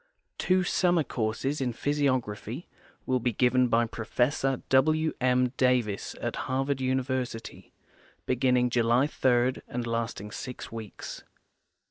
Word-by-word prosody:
Two 185 0 +3
summer 175 -2 +2
courses 125 +4 -2
in 125 -2 0
physiography 130 - -1 0.4
will 130 -1 +1
be 120 0 0
given 125 +2 +3
by 115 0 +3
Professor 125 +4 -1
W. 155 +4 +3
^I. 125 0 +2
Davis 125 -6 +1
at - - -3
Harvard 135 +1 0
University, 130 -2 -2 0.5
beginning 125 -1 +2
July 120 +2 +3
3 130 -3 +1
and 120 0 -3
lasting 115 -3 -3
six 125 +3 -7
weeks. 110 -2 -7
125 Hz, 115 wpm, -28 LUFS, 120-135 Hz, 0.5 s, Two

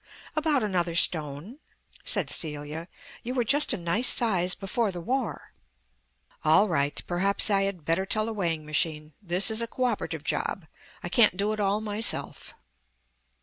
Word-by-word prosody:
"About 305 -5 +1
another 175 -5 -1
stone," 160 - 0 0.4
said - - +1
Celia. 150 +1 -3 0.3
"You 250 +2 -5
were 245 - +1
just 290 +6 +3
a - - 0
nice 175 +8 +2
size 185 -6 +2
before 205 +2 -2
the 180 - -7
War." 255 +9 -3 0.9
"All 210 - +5
right. 145 -5 +1
Perhaps 195 +4 +1
I 195 -1 +3
had 185 -6 -5
better 180 +4 0
tell 215 +1 0
the 225 - -4
weighing 165 -6 -2
machine. 155 0 -1
This 185 +2 +2
is 220 +1 0
a 230 - -2
co 255 - -4
operative 165 - -2
job; 170 +2 -2 0.4
I 175 - -4
can't 210 -1 +4
do 205 +2 0
it 215 - -6
all 205 +1 0
myself." 215 +1 -1
195 Hz, 160 wpm, -26 LUFS, 165-220 Hz, 0.9 s, All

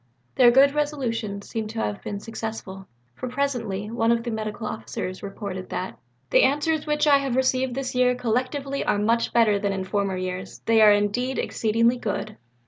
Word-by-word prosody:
Their 250 -2 +6
good 275 +3 +5
resolutions 235 -9 -2
seem 220 -1 -3
to 225 +1 -6
have 205 -2 -2
been 200 - -5
successful, 220 -3 -7 0.3
for 255 - -6
presently 240 -7 -2
one 230 0 +2
of 235 0 +1
the 240 - -3
Medical 220 0 -4
Officers 185 -3 -5
reported 195 -2 -6
that 185 - -5 0.3
"the - - +6
answers 295 +4 +1
which 300 0 +1
I 285 -2 +6
have 270 -3 -2
received 260 -1 +1
this 270 -1 -3
year 250 0 +3
collectively 255 +4 -1
are - - +1
much 230 +3 +1
better 215 -4 +3
than 200 -1 -1
in 190 -1 -3
former 195 0 -1
years, 185 0 -5
they 225 -1 +4
are 210 -1 +8
indeed 205 +6 +1
exceedingly 230 +2 +1
good." 215 -5 -4
230 Hz, 180 wpm, -24 LUFS, 205-255 Hz, 0.3 s, are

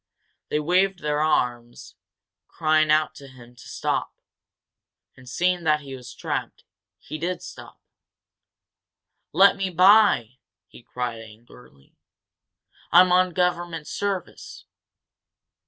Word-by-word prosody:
They 150 - 0
waved 180 +4 +1
their 150 0 -1
arms, 120 -6 -2 0.5
crying 155 -1 +1
out 155 0 +2
to 140 - -13
him 125 -2 -16
to 120 - -15
stop, - - -3 1.0
and, 130 -1 -15
seeing 180 +5 0
that 150 -1 +2
he 135 -2 -9
was 125 -1 -11
trapped, - - -5 0.3
he 155 - -9
did 175 +2 -4
stop. - - -12 1.5
"Let 195 +1 +5
me 195 -1 -3
by," 180 - +4 0.3
he - - -16
cried, 120 -1 -5
angrily. 110 - -18 1.0
"I'm 180 +2 +6
on 180 0 +3
government 175 -3 -2
service!" 200 -3 -5
155 Hz, 110 wpm, -23 LUFS, 125-180 Hz, 1.5 s, I'm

